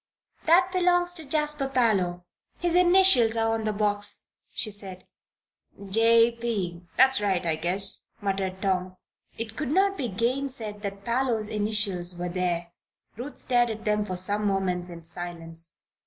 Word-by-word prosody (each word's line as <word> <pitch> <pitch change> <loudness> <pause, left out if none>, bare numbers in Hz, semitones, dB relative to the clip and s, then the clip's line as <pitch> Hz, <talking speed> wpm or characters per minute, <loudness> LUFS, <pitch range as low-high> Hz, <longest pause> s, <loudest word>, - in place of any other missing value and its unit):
"That 360 +3 +5
belongs 355 -1 +2
to 325 -3 -6
Jasper 300 -2 0
Parloe. 200 -9 +1 0.3
His 345 -1 -1
initials 355 -11 +5
are 225 0 +1
on 225 -1 -2
the 215 - +1
box," 205 0 -2 0.3
she 215 - -2
said. 195 -2 -7 0.9
"'J. 230 +2 +5
P.' 195 -8 -3 0.2
that's 265 -2 +5
right, 190 -4 0
I 165 -2 +1
guess," 185 +5 0 0.2
muttered 195 -2 -3
Tom. 185 -1 -1 0.4
It 225 -1 -5
could 300 -4 -3
not 390 +5 +2
be 255 - -1
gainsaid 235 0 -2
that 200 -1 -6
Parloe's 235 -3 0
initials 205 -5 0
were 175 0 -3
there. 175 -1 -2 0.4
Ruth 250 +6 -7
stared 245 -2 +2
at 220 +1 -6
them 210 0 +1
for 185 -3 -4
some 205 +3 +2
moments 180 -2 -1
in 170 -1 -10
silence. 165 -1 -4
210 Hz, 150 wpm, -26 LUFS, 185-250 Hz, 0.9 s, That